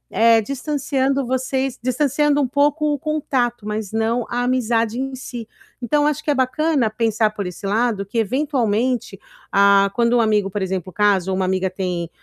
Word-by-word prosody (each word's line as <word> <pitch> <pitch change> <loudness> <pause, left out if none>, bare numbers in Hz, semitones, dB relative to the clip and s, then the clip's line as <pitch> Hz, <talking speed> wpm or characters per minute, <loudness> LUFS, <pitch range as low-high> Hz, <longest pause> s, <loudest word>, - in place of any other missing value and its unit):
eh, 230 0 +5
distanciando 275 +1 -1
vocês 260 +1 -2
distanciando 290 +3 +1
um 265 - +1
pouco 290 +2 +1
o 285 - -3
contato, 255 -7 -1
mas 210 -1 -4
não 225 +2 0
a 245 +1 -1
amizade 235 -2 0
em 270 0 -3
si. 240 -3 -7 0.3
Então, 290 +5 +1
eu - - +3
acho 300 0 -1
que - - -4
é - - +1
bacana 265 0 +1
pensar 220 -1 0
por 205 -2 -5
esse 180 +2 -8
lado, 210 -1 0
que 220 +4 -6
eventualmente, 245 -3 -1 0.3
a 200 0 +4
quando 235 0 +2
um - - +4
amigo, 210 -3 +1
por 205 - -3
exemplo, 185 -1 -3
casa 195 -3 +2
ou - - 0
uma 190 0 0
amiga 190 0 0
tem 180 -3 -3
235 Hz, 180 wpm, -20 LUFS, 205-270 Hz, 0.3 s, eh